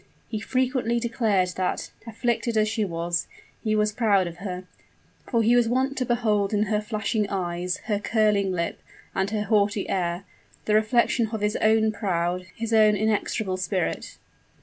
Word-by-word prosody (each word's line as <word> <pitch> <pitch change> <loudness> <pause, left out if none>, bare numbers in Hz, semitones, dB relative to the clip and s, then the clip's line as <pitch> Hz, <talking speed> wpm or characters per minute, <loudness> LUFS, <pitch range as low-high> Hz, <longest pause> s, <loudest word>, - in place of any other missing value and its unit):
He 215 - -3
frequently 255 0 0
declared 225 -6 +1
that, 185 -1 -2 0.2
afflicted 235 0 -1
as 215 0 +3
she 220 0 0
was, 170 -2 -2 0.4
he 215 -2 +1
was 210 0 +2
proud 205 -4 +2
of 170 -1 -7
her: 185 -1 -5 0.7
for 230 -3 +2
he 235 +3 +4
was 240 -2 +3
wont 260 +3 +1
to 255 - 0
behold 215 -4 +1
in 210 - +3
her 210 0 0
flashing 210 -1 -1
eyes 180 -1 -2
her 210 -2 0
curling 210 -3 +2
lip 170 -2 -2 0.3
and 190 +1 0
her 210 0 -1
haughty 205 -1 +1
air, 175 -1 -1 0.4
the 210 - +1
reflection 225 +2 +3
of 220 -1 -5
his 210 0 0
own 220 0 +3
proud 180 -3 -1
his 230 0 -3
own 215 -1 +6
inexorable 210 -2 0
spirit. 185 -1 -2
210 Hz, 165 wpm, -25 LUFS, 190-225 Hz, 0.7 s, own